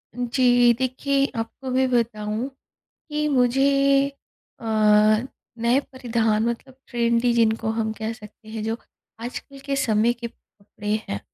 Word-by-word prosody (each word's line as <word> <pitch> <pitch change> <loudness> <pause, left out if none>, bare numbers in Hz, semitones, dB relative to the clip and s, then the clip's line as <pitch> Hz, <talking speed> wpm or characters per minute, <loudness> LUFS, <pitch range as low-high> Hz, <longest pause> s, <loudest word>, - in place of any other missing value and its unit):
जी, 245 -1 +4
देखिए 260 +3 0
आपको 230 +4 -5
मैं 260 0 +2
बताऊँ, 225 0 -1 0.6
कि 300 0 0
मुझे 275 +1 +3 0.5
अ, - - -14 0.9
नए 235 +3 +3
परिधान 225 -4 0
मतलब 255 +2 -6
ट्रेंडी 235 0 +2
जिनको 225 -1 +2
हम 220 -1 0
कह 220 0 -4
सकते 215 -1 -14
हैं 220 -1 -5
जो 225 +1 -2 0.4
आजकल 255 +4 -7
के 280 - -1
समय 230 -3 +2
के 235 0 -6
कपड़े 210 -2 -7
हैं, 100 - -3
240 Hz, 125 wpm, -23 LUFS, 225-260 Hz, 0.9 s, जी